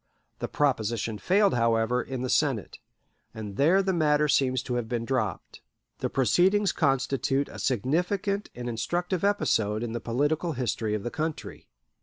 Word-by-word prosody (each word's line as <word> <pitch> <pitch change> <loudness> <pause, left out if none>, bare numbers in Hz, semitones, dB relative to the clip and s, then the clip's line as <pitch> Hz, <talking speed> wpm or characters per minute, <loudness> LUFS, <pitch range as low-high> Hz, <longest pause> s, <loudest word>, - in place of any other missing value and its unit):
The - - -3
proposition 115 -6 -1
failed, 200 +1 +3
however, 115 +1 +2
in 130 -1 -5
the - - -1
Senate, 135 -9 0 0.6
and 105 -3 -6
there 170 - +4
the 190 0 0
matter 150 -2 +2
seems 130 -3 +2
to 125 - -4
have 120 -2 -2
been 120 -1 -2
dropped. 115 -8 -3 0.4
The - - -1
proceedings 185 - +3
constitute 135 -1 0
a - - -10
significant 180 - 0
and 120 0 -6
instructive 175 - -2
episode 110 - +1
in 120 - -3
the 120 0 -4
political 145 +8 0
history 115 -4 -1
of 105 - -4
the 120 - -4
country. 155 0 -5
130 Hz, 155 wpm, -27 LUFS, 115-165 Hz, 0.6 s, there